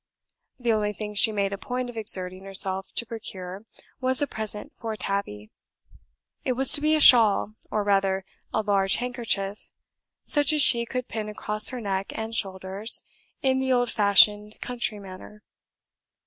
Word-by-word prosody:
The 240 -3 0
only 210 -1 -1
thing 210 0 -6
she 215 +2 +5
made 200 -1 -1
a 200 - -6
point 250 0 -4
of 245 - -9
exerting 185 -4 -1
herself 195 0 +1
to 235 - 0
procure 195 -3 -7 0.3
was 260 -1 +1
a 290 - +2
present 220 +3 -6
for 225 -2 -4
Tabby. 110 - -4 0.9
It 260 - 0
was 265 +1 +1
to 290 - +6
be 310 +1 +3
a - - +2
shawl, 225 -6 +6 0.2
or 210 - -1
rather 195 -1 +1 0.3
a 220 - -1
large 195 -2 +2
handkerchief, 225 -5 -2 0.6
such 290 +1 +2
as 300 -2 +6
she 235 -2 +5
could 250 0 -4
pin 215 -1 -5
across 210 0 -3
her 255 - -6
neck 195 -3 -3
and 220 +1 -5
shoulders, 195 +1 -3 0.4
in 265 -1 +2
the 265 0 -1
old 245 -1 +2
fashioned 210 +1 +4
country 240 -3 -3
manner. 200 +2 -12
210 Hz, 160 wpm, -25 LUFS, 195-245 Hz, 0.9 s, to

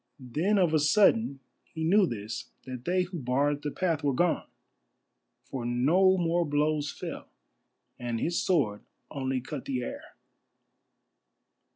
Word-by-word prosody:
Then 195 +7 +2
of 175 -4 +3
a 155 - +4
sudden 195 - +3 0.2
he 160 - -7
knew 190 +4 +4
this, 110 -3 -5 0.2
that 130 -1 -7
they 180 +1 +2
who 180 -1 -6
barred 140 +3 0
the 150 - -2
path 165 -1 -1
were 140 -2 +1
gone, 175 +4 +1 1.0
for 130 -3 -6
no 160 +11 +3
more 175 0 +1
blows 150 -1 0
fell, - - -7 0.7
and 120 -1 -2
his 170 +7 0
sword 130 - +1 0.3
only 130 -2 -2
cut 135 +1 -6
the 125 -2 -2
air. - - -8
150 Hz, 140 wpm, -29 LUFS, 130-175 Hz, 1.0 s, a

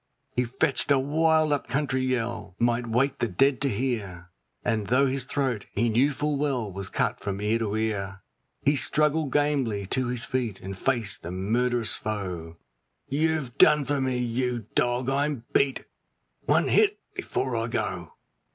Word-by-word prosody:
He 125 - +2
fetched 130 +3 0
a 140 - +5
wild 155 +2 +2
up 145 - -2
country 135 -1 0
yell 115 -6 -2
might 120 +1 +1
wake 130 +4 +1
the 120 - +1
dead 130 +8 +2
to 140 - +2
hear, 100 -7 -3 0.3
And 110 -3 0
though 130 +3 +4
his 135 -1 0
throat, 130 -6 -2
he 115 +3 +2
knew 125 +6 +3
full 150 +1 -1
well, 130 -7 -1
was 95 0 -4
cut - - -1
from 100 -1 -4
ear 105 +2 +1
to 105 -2 -2
ear, 100 -3 -2 0.4
He 145 +2 +3
struggled 150 +1 +2
gamely 135 -9 +1
to 130 +6 -1
his 120 -1 -2
feet, 120 -7 -2
and 95 +1 -6
faced 110 -2 -1
the 85 - -7
murd'rous 115 +5 0
foe: 90 -6 -5 0.5
'You've 150 -3 0
done 150 -2 +6
for 140 +1 0
me! 130 -1 0
you 120 -1 -1
dog, 120 +1 +1
I'm 140 -2 0
beat! 135 -2 +2 0.6
one - - +3
hit 420 -1 +4 0.2
before - - -2
I - - -1
go! - - -3
125 Hz, 165 wpm, -26 LUFS, 110-140 Hz, 0.6 s, done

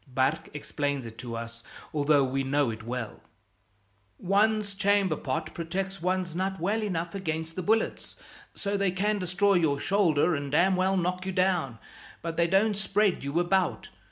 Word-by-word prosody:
Barque 130 +4 0
explains 145 -2 -2
it 115 0 -10
to 120 -2 -5
us, 115 0 -6 0.3
although 145 -1 +3
we 135 +1 -1
know 140 -2 +1
it 110 0 -7
well: 120 -1 -5 1.0
"One's 205 +2 +1
chamber 200 -3 +2
pot 130 -3 -3
protects 190 +3 -4
one's 180 -1 -1
nut 190 +1 -2
well 205 +6 0
enough 175 -5 -2
against 160 -4 -3
the 185 - -2
bullets. 220 +5 0 0.4
So 200 -1 -2
they 200 -1 +2
can 205 +3 0
destroy 190 +2 +2
your 160 -6 +2
shoulder 180 -4 +2
and 140 -2 -3
damn 180 +5 +4
well 190 +1 +2
knock 180 +1 -1
you - - -1
down, 180 - +1 0.5
but 165 -1 -3
they 170 0 +3
don't 200 +4 +3
spread 205 -3 +1
you 140 +4 0
about. 180 +1 0
175 Hz, 165 wpm, -28 LUFS, 145-195 Hz, 1.0 s, damn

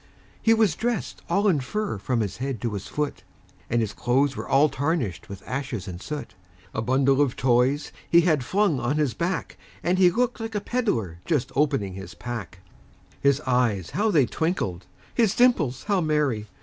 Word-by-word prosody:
He 225 0 +5
was 220 -7 +3
dressed 235 +1 -2
all 200 +1 +2
in 170 -7 +3
fur 200 - -3
from 120 +3 0
his 100 -3 -3
head 130 -2 -3
to 115 -3 -2
his 100 -1 -5
foot, 150 -1 -3 0.5
And 120 0 +2
his 110 -3 -2
clothes 135 +3 +1
were - - -5
all 145 +3 +5
tarnished 140 - -2
with 100 -1 -8
ashes 125 -6 -4
and 90 -1 -7
soot; 150 +2 -6 0.4
A 110 - -1
bundle 135 +3 +3
of 140 -4 +1
toys 130 +3 +2 0.2
he 170 - +7
had 155 -6 +2
flung 185 - +1
on 135 +5 0
his 145 -6 +1
back, 175 +1 -3 0.2
And 180 +2 +1
he 180 -1 +7
looked 240 +6 0
like 225 -1 -5
a - - +2
peddler 160 - -1
just 150 -7 0
opening 120 -9 +1
his 95 +1 -9
pack; 110 -7 -6 0.6
His 140 +1 +3
eyes 120 - +1
how 215 +2 +1
they 150 -10 +4
twinkled! 115 - -2 0.3
his 225 -3 +2
dimples 170 - +3
how 200 -3 +1
merry! 150 -9 0
140 Hz, 185 wpm, -25 LUFS, 120-175 Hz, 0.6 s, he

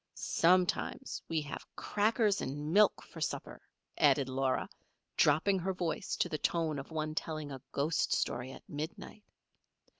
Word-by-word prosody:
"Sometimes 180 +9 +1
we 160 -1 +1
have 145 - -6
crackers 210 0 +1
and 145 +4 -3
milk 210 0 +5
for - - -11
supper," - - -3 0.4
added 135 - +4
Laura, 130 0 0 0.5
dropping 165 +7 +4
her 190 +2 -1
voice 175 -3 -2
to - - +1
the 155 - -3
tone 160 -4 0
of 135 - -8
one 155 -1 -2
telling 155 -2 -4
a 135 -2 -7
ghost 145 +3 +1
story 125 +2 0
at - - -12
midnight. 160 +7 -6
155 Hz, 145 wpm, -33 LUFS, 145-185 Hz, 0.5 s, milk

